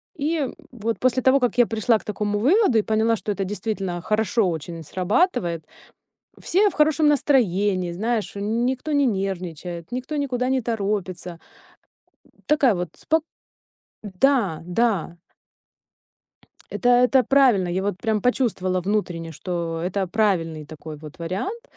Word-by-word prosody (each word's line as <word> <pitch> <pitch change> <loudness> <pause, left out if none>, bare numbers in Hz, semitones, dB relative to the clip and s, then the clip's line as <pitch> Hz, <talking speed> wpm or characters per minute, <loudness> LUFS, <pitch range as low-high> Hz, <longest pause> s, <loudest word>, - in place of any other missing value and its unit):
И, 315 +1 -1
м, 275 -4 -2 0.2
вот 230 -2 -3
после 255 0 +2
того, 260 +2 +4
как 245 -2 0
я 240 -2 +5
пришла 225 0 +2
к - - -18
такому 210 0 -2
выводу 310 - +4
и - - +3
поняла, 220 +1 +2
что 210 - -4
это 195 0 -2
действительно 190 -2 -3
хорошо 215 0 +1
очень 165 +1 -5
срабатывает, 180 - 0 0.7
все 400 +4 +2
в - - -11
хорошем 305 0 +3
настроении, 205 -11 +2
знаешь, 220 +5 -2
никто 240 +8 -1
не 285 -1 +3
нервничает, 180 - -3
никто 255 +5 -4
никуда 255 -3 -1
не 265 -1 +1
торопится 200 -6 -3 1.1
такая 285 -6 +4
вот 180 -2 -3
спок 320 0 0 0.8
Да, 205 - +1
да. 180 -3 0 1.5
Это 245 - 0
это 250 +1 +5
правильно, 250 -8 +4
я 180 +2 -1
вот 200 -2 -2
прям 215 -1 0
почувствовала 195 -7 0
внутренне, 180 -4 -2
что 165 0 -4
это 190 +2 -1
правильный 170 -7 0
такой 155 0 -9
вот 155 +3 -11
вариант, 195 - -4
210 Hz, 140 wpm, -23 LUFS, 180-250 Hz, 1.5 s, я